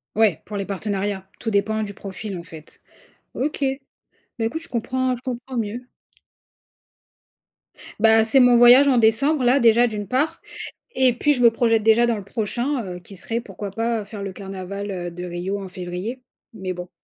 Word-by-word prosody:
Ouais, 215 -6 +3
pour 210 - -7
les 195 -1 -2
partenariats. 200 -1 -3
Tout 225 - -2
dépend 220 +2 +1
du 200 -1 -6
profil 195 0 -7
en 170 - -8
fait. 160 -2 -13 0.5
OK, 295 +3 -3
mais 270 0 -4 0.4
écoute, 320 +8 -4
je - - -10
comprends 255 +2 -1
je 245 - -11
comprends 255 0 -5
mieux. 235 +3 -4 2.1
Bah 225 0 +6
c'est 260 +4 +4
mon 245 -1 +6
voyage 245 +4 +8
en 260 - +3
décembre 245 +5 +3
là 260 +3 +4
déjà 235 +1 +5
d'une 210 -2 -4
part 275 +7 0 0.5
et 255 -2 +4
puis 295 +5 +2
je 250 - -2
me 235 - +8
projette 225 -1 +2
déjà 225 +2 +5
dans 235 -2 0
le 200 - -8
prochain, 240 +5 -2
heu, 180 -1 -6
qui 190 +3 -13
serait 230 +5 -3
pourquoi 200 -2 -7
pas 225 +1 -1
faire 205 0 -8
le 195 - -5
carnaval, 195 +1 -6
heu, 175 -2 -4
de 180 +1 -8
Rio 180 +3 -4
en 190 - -8
février, 185 +8 -6 0.3
mais 190 -4 -4
bon. 180 0 -8
220 Hz, 185 wpm, -22 LUFS, 195-245 Hz, 2.1 s, voyage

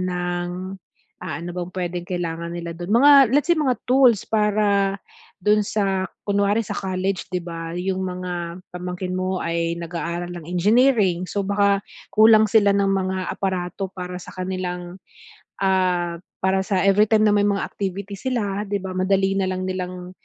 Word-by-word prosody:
ng, 180 +1 -3 0.5
ah, 150 - -4
ano 175 +1 -6
bang 180 0 -4
puwedeng 175 -1 -3
kailangan 170 -2 -3
nila 170 -1 -5
dun 175 +5 -2
mga 280 -3 +7
let's 290 +2 +2
say 340 - +5
mga 265 -5 +1
tools 250 -5 +5
para 205 -2 +2 0.4
dun 210 0 +3
sa 195 -3 0 0.2
kunwari 205 +1 +2
sa - - -5
college 190 0 -2
'di 180 - 0
ba 165 -1 -6
yung 190 +1 -2
mga 180 -1 -5
pamangkin 180 +1 -4
mo 185 0 -1
ay 170 0 -1
nag-aaral 170 +1 -4
ng 170 - -8
engineering 200 0 +3
so 205 - -2
baka 200 0 +2 0.3
kulang 220 0 +7
sila 205 -2 +5
ng 200 -1 +2
mga 190 -1 0 0.2
aparato 190 0 -3
para 180 -1 -6
sa - - -11
kanilang, 180 -1 -4 0.7
ah, 180 -3 +1 0.2
para 190 0 +2
sa 190 -2 0
everytime 210 +2 +4
na 210 - +4
may 205 - +3
mga 200 -1 0
activity 200 +1 -4
sila 210 -3 -2
'di 200 0 -1
ba 190 - -4
madali 195 +1 +2
nalang 185 -1 -1
nilang, 180 -1 -5
190 Hz, 155 wpm, -22 LUFS, 180-200 Hz, 0.7 s, mga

